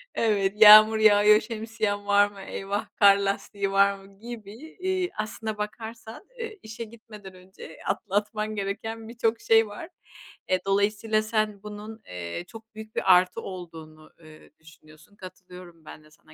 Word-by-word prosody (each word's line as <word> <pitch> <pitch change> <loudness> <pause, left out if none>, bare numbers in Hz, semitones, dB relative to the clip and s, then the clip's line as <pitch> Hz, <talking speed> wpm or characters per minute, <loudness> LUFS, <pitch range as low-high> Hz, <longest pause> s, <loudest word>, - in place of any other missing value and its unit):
Evet 200 -3 +1
yağmur 215 +1 +9
yağıyor, 210 0 +5
şemsiyen 220 -2 -4
var 205 0 +4
mı? 195 -1 -12
Eyvah 200 +2 -5
kar 200 -1 +6
lastiği 200 0 -3
var 200 0 +4
mı 195 0 -18
gibi, 235 +5 -11
iii, 370 -1 -2
aslına 215 0 -5
bakarsan, 220 - -8 0.2
eee, 445 -3 -7
işe 220 +1 -8
gitmeden 215 -3 -13
önce 185 -3 -14
atlatman 215 +2 -2
gereken 220 +3 -5
birçok 230 -1 -1
şey 225 -1 +4
var. 205 - -9 0.6
Eee, 185 - +2
dolayısıyla 210 +2 +1
sen 215 -2 -2
bunun, 210 +1 -9
eee, 90 - -6
çok 225 +1 -14
büyük 220 0 -11
bir 185 - +4
artı 180 0 +1
olduğunu, 160 -4 -10
eee, 155 -2 -16
düşünüyorsun. 160 +4 -19
Katılıyorum 180 -3 -13
ben 155 - -12
de 155 - -22
sana 155 0 -21
210 Hz, 145 wpm, -25 LUFS, 195-220 Hz, 0.6 s, yağmur